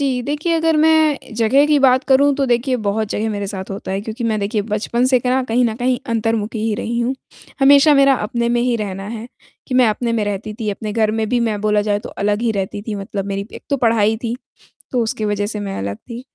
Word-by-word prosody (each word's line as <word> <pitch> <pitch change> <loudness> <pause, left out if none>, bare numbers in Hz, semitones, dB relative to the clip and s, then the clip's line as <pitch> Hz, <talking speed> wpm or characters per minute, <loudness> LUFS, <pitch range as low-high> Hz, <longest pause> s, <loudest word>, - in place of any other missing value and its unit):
जी, 265 -3 0
देखिए 295 +6 -2
अगर 325 -1 +2
मैं 310 -5 +2
जगह 235 +6 +3
की 300 -1 +3
बात 260 -1 +4
करूँ 280 +1 +4
तो 275 - +1
देखिए 250 +2 +1
बहुत 210 +1 0
जगह 220 +2 -2
मेरे 205 -1 -3
साथ 190 -1 -6
होता 195 0 -6
है 195 - -1
क्योंकि 220 +3 -5
मैं 220 -2 0
देखिए 205 +1 -1
बचपन 220 +3 -1
से 255 - +6
कहें 250 +1 0
ना 260 0 +2
कहीं 245 +1 +1
न 225 -2 0
कहीं 250 +1 0 0.2
अंतर्मुखी 225 0 -1
ही 220 - 0
रही 235 +3 -3
हूँ। 245 +3 0 0.5
हमेशा 285 +2 +6
मेरा 275 -1 +5
अपने 235 -1 -1
में - - +2
ही 245 -1 +1
रहना 195 -2 -5
है, 225 0 -6 0.4
कि 255 - -4
मैं 250 -3 +5
अपने 230 +2 -1
में 220 -2 0
रहती 205 +1 -4
थी, 210 -2 -1
अपने 210 +1 -5
घर 220 -1 +2
में 220 -1 -1
भी 245 0 +1
मैं 210 -1 -3
बोला 210 0 +2
जाए 205 - +2
तो - - -9 0.2
अलग 210 +2 +1
ही 235 - +1
रहती 195 +2 -5
थी 220 - -3
मतलब 195 0 -4
मेरी 200 0 -4
एक - - -10
तो 280 - +2
पढ़ाई 220 -1 +2
थी, 235 +1 -4 0.6
तो 250 - +1
उसकी 220 -1 -2
वज़ह 205 -1 -1
से 210 0 -4
मैं 195 -1 -4
अलग 100 +1 -4
थी। 235 - -9
225 Hz, 250 wpm, -19 LUFS, 210-255 Hz, 0.6 s, से